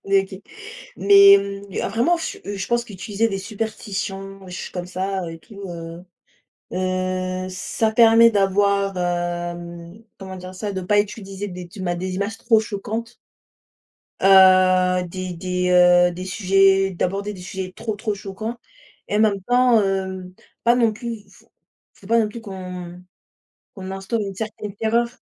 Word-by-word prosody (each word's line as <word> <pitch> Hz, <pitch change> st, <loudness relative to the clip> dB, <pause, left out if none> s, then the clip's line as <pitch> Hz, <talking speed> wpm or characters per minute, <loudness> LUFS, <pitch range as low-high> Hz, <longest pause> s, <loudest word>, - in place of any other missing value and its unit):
N 195 Hz, -, -6 dB
hé 195 Hz, -, +5 dB
OK. 190 Hz, -, -9 dB, 0.5 s
Mais, 200 Hz, 0 st, +8 dB
mmh, 200 Hz, 0 st, -6 dB
vraiment, 240 Hz, -, +2 dB
je 325 Hz, -, -5 dB, 0.2 s
je 190 Hz, -, -4 dB
pense 240 Hz, 0 st, 0 dB
qu'utiliser 210 Hz, +2 st, -2 dB
des 195 Hz, -2 st, -3 dB
superstitions 195 Hz, -2 st, -5 dB
des 185 Hz, -, -11 dB
choses 180 Hz, -, -6 dB
comme 180 Hz, -1 st, -5 dB
ça 190 Hz, +1 st, -3 dB
et 165 Hz, -, -9 dB
tout, 200 Hz, +3 st, -14 dB
heu, 170 Hz, +1 st, -8 dB, 0.7 s
heu, 185 Hz, 0 st, -2 dB
ça 220 Hz, +4 st, -1 dB
permet 230 Hz, 0 st, +7 dB
d'avoir, 200 Hz, 0 st, +2 dB
hem, 175 Hz, +1 st, -4 dB, 0.2 s
comment 190 Hz, -1 st, -8 dB
dire 185 Hz, +1 st, -9 dB
ça? 205 Hz, +2 st, -4 dB
De 190 Hz, -1 st, -4 dB
pas 205 Hz, +3 st, +2 dB
utiliser 205 Hz, -1 st, -4 dB
des 180 Hz, -2 st, -8 dB
duma 175 Hz, -1 st, -4 dB
des 185 Hz, +1 st, -4 dB
images 205 Hz, +3 st, -3 dB
trop 225 Hz, -2 st, +3 dB
choquantes 220 Hz, +2 st, -5 dB, 1.1 s
heu, 185 Hz, -1 st, +5 dB
des 185 Hz, 0 st, -5 dB
des, 180 Hz, +1 st, -2 dB
heu, 180 Hz, 0 st, +6 dB
des 180 Hz, +2 st, -7 dB
sujets, 195 Hz, 0 st, +3 dB
d'aborder 195 Hz, +4 st, -2 dB
des 185 Hz, -, -10 dB
sujets 185 Hz, 0 st, -6 dB
trop, 220 Hz, -2 st, -4 dB
trop 215 Hz, 0 st, -2 dB
choquants 205 Hz, +4 st, -6 dB, 0.5 s
et 210 Hz, -, 0 dB
en -, -, +3 dB
même 205 Hz, -3 st, +2 dB
temps, 245 Hz, 0 st, +4 dB
hem, 190 Hz, -1 st, -3 dB, 0.3 s
pas 235 Hz, +1 st, +4 dB
non 230 Hz, -3 st, +3 dB
plus 225 Hz, -1 st, -7 dB
faut -, -, -22 dB, 0.4 s
faut 195 Hz, -, -17 dB
pas 230 Hz, +2 st, +3 dB
non 215 Hz, -, 0 dB
plus 230 Hz, +2 st, -8 dB
qu'on 180 Hz, -3 st, -8 dB, 0.7 s
qu'on 190 Hz, -2 st, -8 dB
instaure 195 Hz, +4 st, -3 dB
une 195 Hz, -2 st, -4 dB
certaine 210 Hz, -1 st, -6 dB
terreur. 230 Hz, +2 st, +1 dB
195 Hz, 160 wpm, -22 LUFS, 185-210 Hz, 1.1 s, Mais